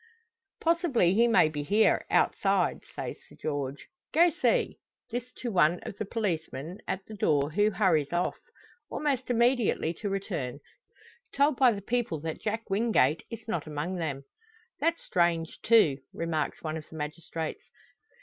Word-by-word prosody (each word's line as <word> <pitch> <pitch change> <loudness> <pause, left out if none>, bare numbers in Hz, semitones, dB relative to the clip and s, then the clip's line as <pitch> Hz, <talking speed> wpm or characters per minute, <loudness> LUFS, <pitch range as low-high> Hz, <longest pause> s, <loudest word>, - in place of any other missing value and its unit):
"Possibly 325 - +3
he 230 +4 +4
may 230 -8 +5
be 150 -1 -3
here, 205 +9 +3
outside," - - +2
says - - -4
Sir - - -15
George. 145 -2 -3 0.3
"Go 340 +2 +5
see!" 340 - +1 0.3
This 245 +1 -4
to 240 - -5
one 175 -2 +3
of - - -6
the 215 - -1
policemen 175 - -3
at 190 0 -3
the 220 - -10
door, 150 -7 +1
who 205 +6 +3
hurries 175 -9 +2
off. 175 +1 -1 0.5
Almost 275 -4 -1
immediately 235 -8 +2
to 205 +4 -4
return 175 - -3 0.8
told 285 +1 +4
by 255 -3 +6
the 200 -3 -5
people 225 -8 -1
that 160 0 -5
Jack 220 +1 -3
Wingate 195 - +2
is 230 -1 -8
not 170 -8 -2
among 155 +5 -3
them. 145 -5 -3 0.6
"That's 335 0 0
strange, 170 -2 0
too!" 190 -12 +5
remarks 165 -2 -2
one 155 0 -2
of 155 - -10
the - - -11
magistrates. 160 +1 -5
185 Hz, 150 wpm, -29 LUFS, 155-230 Hz, 0.8 s, by